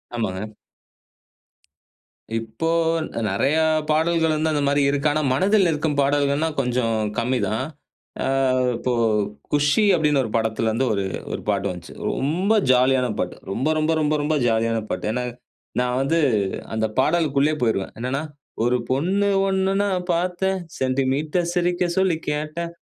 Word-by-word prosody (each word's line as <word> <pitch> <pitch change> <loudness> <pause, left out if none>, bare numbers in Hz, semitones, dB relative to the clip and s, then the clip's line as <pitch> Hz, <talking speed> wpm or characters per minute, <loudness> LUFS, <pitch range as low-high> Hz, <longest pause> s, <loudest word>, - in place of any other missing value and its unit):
ஆமாங்க. 105 -1 -3 1.9
இப்போ 115 +8 -4 0.6
நிறைய 130 +10 +1 0.3
பாடல்கள் 160 +1 +2
வந்து 155 +1 0
அந்த 145 - 0
மாரி 145 +1 +2
இருக்கு. 140 +1 +1
ஆனா 155 - +1
மனதில் 190 +6 +3
நிற்க்கும் 150 -2 -1
பாடல்கள்னா 140 +2 +1
கொஞ்சம் 125 -3 0 0.2
கம்மிதான். 115 -3 0 0.6
ஆ - - -1 0.5
இப்போ 125 +1 -1 0.6
குஷி 145 +8 +3
அப்படின்னு 150 -4 +2
ஒரு 115 - -4
படத்துல 110 0 0
இருந்து 115 +4 0
ஒரு 100 -1 -1 0.3
ஒரு - - -4
பாட்டு 100 -1 0
வந்துச்சு. 90 -1 -8 0.2
ரொம்ப 175 +10 0 0.2
ஜாலியான 130 0 +3
பாட்டு. 90 - -2 0.2
ரொம்ப, 130 +9 -1
ரொம்ப, 155 +1 +1
ரொம்ப, 150 0 +1
ரொம்ப 150 +2 0
ஜாலியான 115 0 +1
பாட்டு. - - -3
ஏன்னா 125 +2 -2 0.6
நான் 125 0 0
வந்து 165 +5 +1 0.6
அந்த 110 0 +1
பாடல்குள்ளேயே 150 0 +2
போயிருவேன். 110 -5 0
என்னன்னா 130 +4 -2 0.4
ஒரு 125 +1 +2
பொண்ணு 185 +10 +1 0.2
ஒண்ணு 190 0 +1
நான் 185 -3 -1
பாத்தேன் 180 +2 0 0.2
சென்டிமீட்டர் 135 +6 0
சிரிக்க 175 0 +1
சொல்லி 190 -3 +2
கேட்டேன். 155 +3 -3
145 Hz, 130 wpm, -22 LUFS, 125-165 Hz, 1.9 s, மனதில்